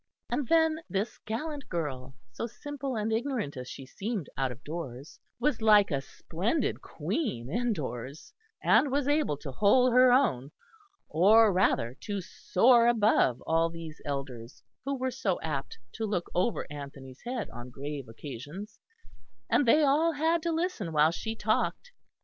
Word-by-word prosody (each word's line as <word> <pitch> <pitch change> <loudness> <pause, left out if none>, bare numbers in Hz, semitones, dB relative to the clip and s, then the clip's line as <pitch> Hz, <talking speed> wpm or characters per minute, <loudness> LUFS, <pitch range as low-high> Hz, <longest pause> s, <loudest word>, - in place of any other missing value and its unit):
And 250 +1 -1
then 320 +1 +3
this 200 +4 -2
gallant 285 +6 -4
girl, 135 -6 -4 0.2
so 230 - -4
simple 275 +2 -5
and 220 0 -1
ignorant 230 - -2
as 125 -1 -7
she 135 - -8
seemed 200 - -4
out 135 -2 0
of 125 +4 -11
doors, 145 -4 -7 0.2
was 255 -2 0
like 210 -3 +6
a 140 -2 0
splendid 185 - -2
queen 140 - -3
indoors, 150 - -3 0.3
and 285 - +4
was 280 0 0
able 290 - +1
to 140 -1 -7
hold 235 - +4
her 255 0 +7
own, 150 - +2 0.6
or 205 +6 +5
rather 125 -10 +2
to 205 -1 -3
soar 235 +6 +3
above 215 - +3
all 165 +1 +2
these 165 -2 -9
elders 135 -4 -6 0.2
who 275 0 -1
were 260 0 -1
so 215 -8 -1
apt 140 -4 -4
to 220 -1 -3
look 180 -4 -2
over 185 +6 0
Anthony's 140 -3 -9
head 240 -1 -4
on 120 +1 -8
grave 140 +1 -6
occasions; 145 - -8 0.7
and 280 - +3
they 300 +6 +6
all 305 +4 +3
had 320 +3 +1
to 335 +1 -1
listen 325 - -2
while 155 +1 +5
she 220 +6 -4
talked. 220 - -1
205 Hz, 155 wpm, -29 LUFS, -, 0.7 s, her